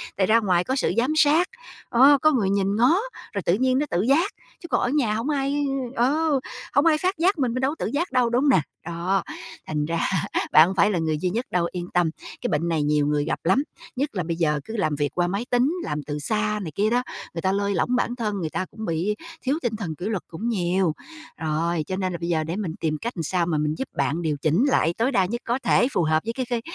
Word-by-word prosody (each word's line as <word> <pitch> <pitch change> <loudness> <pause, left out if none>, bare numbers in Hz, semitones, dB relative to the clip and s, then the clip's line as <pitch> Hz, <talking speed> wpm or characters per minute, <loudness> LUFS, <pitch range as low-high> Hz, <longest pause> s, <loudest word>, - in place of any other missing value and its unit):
Tại 190 -1 +1
ra 230 +1 +5
ngoài 180 -5 +2
có 260 - -1
sự 265 - +1
giám 250 +6 +2
sát, 315 +4 +4 0.4
ờ, 270 +4 +6
có 310 - +5
người 215 -8 +1
nhìn 200 0 +1
ngó, 245 +9 +4 0.4
rồi 200 - -2
tự 170 - +3
nhiên 255 +4 +2
nó 295 - +1
tự 175 - +1
giác, 285 - +2 0.3
chứ 340 - -9
còn - - +1
ở 245 - +1
nhà 260 -7 +1
hổng 230 +6 -2
ai 285 0 0 0.3
ờ, 285 +4 +2 0.3
hổng 285 +3 +4
ai 320 -2 +5
phát 370 +4 -1
giác 360 +2 +2
mình, 245 -3 +1
mình 255 - -2
đâu 270 +2 +2
có - - -6
tự - - -2
giác 330 +2 -1
đâu, 250 -2 +2
đúng 240 +2 +2
hông 290 - +3
nè, 185 - +5 0.2
đó. 175 +3 -1 0.4
Thành 150 -1 -1
ra 165 +2 -1 0.5
bạn 155 +2 +8
hông 190 - -3
phải 200 +3 +4
là 180 - 0
người 155 -1 0
duy 180 +4 -1
nhất 235 +7 -2
đâu, 175 -1 +1
yên 175 -1 -5
tâm. 175 -2 +3 0.3
Cái - - -1
bệnh 155 +3 0
này 160 -3 +1
nhiều 150 0 +2
người 145 0 +1
gặp 160 - -2
lắm, 190 +11 +3 0.3
nhất 280 +3 -1
là 180 - -1
bây 165 +1 -2
giờ 150 -3 +1
cứ 225 - -6
làm 155 -7 0
việc 145 0 0
qua 175 -1 +1
máy 200 +6 -2
tính, 250 +5 +2
làm 150 0 -3
từ 150 +1 -4
xa 210 +6 -1
này 160 - -5
kia 210 +2 +2
đó, 245 +1 +1 0.3
người 165 - -4
ta 190 - +1
lơi 200 +1 0
lỏng 250 +7 +1
bản 245 0 0
thân, 215 -4 -2
người 160 -3 -2
ta 185 - -2
cũng 220 +1 -7
bị 175 +4 -1 0.3
thiếu 275 +3 0
tinh 235 -3 -1
thần 180 -7 -4
kỷ 175 - -7
luật 210 -5 -2
cũng 215 +8 -4
nhiều. 180 -4 +1 0.4
Rồi, 160 +1 -1
cho 185 - -2
nên 185 -1 -1
là - - -3
bây 170 - -3
giờ 160 -2 +1
để 165 +3 -4
mình 185 -6 -3
tìm 155 -2 -1
cách 235 - -3
làm 165 - -2
sao 175 +2 0
mà 165 -2 0
mình 150 +1 0
giúp 265 - -3
bạn 145 +5 0
điều 155 -3 0
chỉnh 165 - +2
lại 170 - +2
tối 245 +4 +1
đa 190 - +3
nhất 235 +6 -4
có 240 +2 0
thể, 245 - +4
phù 175 - +2
hợp 155 0 +2
với 230 - -2
cái 260 0 -3
cái 235 -2 -1
200 Hz, 270 wpm, -24 LUFS, 165-250 Hz, 0.5 s, bạn